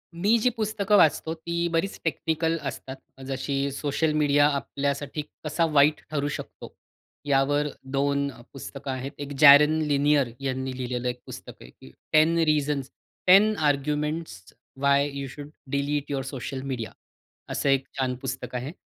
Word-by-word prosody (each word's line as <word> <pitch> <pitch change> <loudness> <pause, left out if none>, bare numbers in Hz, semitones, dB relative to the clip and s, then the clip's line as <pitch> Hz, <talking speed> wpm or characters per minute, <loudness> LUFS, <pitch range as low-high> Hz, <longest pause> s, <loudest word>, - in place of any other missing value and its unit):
मी 205 +7 +3
जी 250 - +5
पुस्तकं 215 -3 +1
वाचतो 160 0 +3
ती 170 +1 -2
बरीच 170 +4 -1
टेक्निकल 160 0 -1
असतात. 130 - -6 0.3
जशी 140 +1 -2
सोशल 150 +3 -1
मीडिया 145 0 +4
आपल्यासाठी 140 +1 -2 0.2
कसा 155 +2 +1
वाईट 150 +1 +4
ठरू 145 -1 -1
शकतो, - - -10 0.5
यावर 145 +1 +2 0.3
2 140 0 +1 0.2
पुस्तकं 140 0 -7
आहेत. 130 +1 -5
एक 145 0 -6
जेरॉन 150 +1 +8
लैनियर 145 -3 +2
यांनी 130 -1 -3
लिहिलेलं 125 -1 -3
एक 125 0 -5
पुस्तक - - -10
आहे, - - -12
की 65 - -16 0.2
ten 155 +2 +5
reasons 145 -2 0 0.4
ten 205 +4 +6
arguments 150 - -2 0.3
why 140 +1 +3
you 140 -1 -4
should 145 +2 -9 0.2
delete 145 +1 -1
your 135 -1 -1
social 135 0 -5
media. 115 -4 -4 0.6
असं 140 - -1
एक 135 -1 +2
छान 130 -1 0
पुस्तक 130 -1 -5
आहे. 125 +4 -4
145 Hz, 145 wpm, -26 LUFS, 135-155 Hz, 0.6 s, जेरॉन